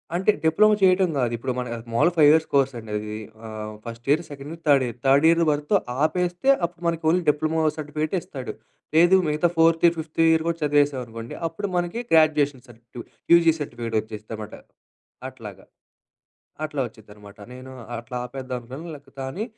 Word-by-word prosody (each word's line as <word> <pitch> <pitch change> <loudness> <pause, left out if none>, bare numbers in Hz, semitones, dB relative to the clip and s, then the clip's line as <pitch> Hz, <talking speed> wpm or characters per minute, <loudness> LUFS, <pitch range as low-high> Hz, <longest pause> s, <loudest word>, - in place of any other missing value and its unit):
అంటే 190 +4 +3
డిప్లొమా 210 +7 +4
చేయటం 185 -1 +4
గాదు 120 -3 0
ఇప్పుడు 125 +3 -3
మన 125 -1 -3 0.3
మామూలుగా 170 +9 +3
5 150 -2 +7
ఇయర్స్ 160 0 +4
కోర్స్ 135 -1 +3
అండి 110 -2 -9
అది. 105 0 -5 0.3
ఆహ్, 110 -1 -7
first 115 0 -9
year, 155 +4 +4
second 145 0 -9
year, 165 0 -10
third 140 -3 +5
year. 120 0 -6
Third 140 +3 +5
year 170 0 +3
వరతు 150 +7 0 0.3
ఆపేస్తే 180 +8 0 0.2
అప్పుడు 170 0 -9
మనకు 165 -1 -1
ఓన్లీ 180 +1 +2
డిప్లొమో 155 +2 0 0.2
సర్టిఫికేటే 155 +3 -2
ఇస్తాడు. 130 -3 -7 0.4
లేదు 175 +3 +6
మిగతా 155 +3 +2
ఫోర్త్ 165 0 +4
ఇయర్, 170 0 +4
ఫిఫ్త్ 160 0 -8
ఇయర్ 160 0 +2
కూడా 170 - -1
చదివేసామనుకోండి 130 -6 0
అప్పుడు 200 +5 -5
మనకి 175 +6 -1
గ్రాడ్యుయేషన్ 150 -5 +3
సర్టిఫికేటు, 120 +1 -12 0.3
యూజీ 165 -1 +6
సర్టిఫికేట్ 115 -5 -5
వచ్చేదన్నమాట. 110 0 -8 0.8
అట్లాగా. - - -11 1.0
అట్లా 150 -2 -3
వచ్చిద్దనమాట 105 -2 -15
నేను 130 +1 -10 0.3
అట్లా 120 +2 -8
ఆపేద్దాం 130 +1 -7
లే 145 - -9 0.2
కానీ 135 +11 -4
145 Hz, 160 wpm, -24 LUFS, 120-165 Hz, 1.0 s, 5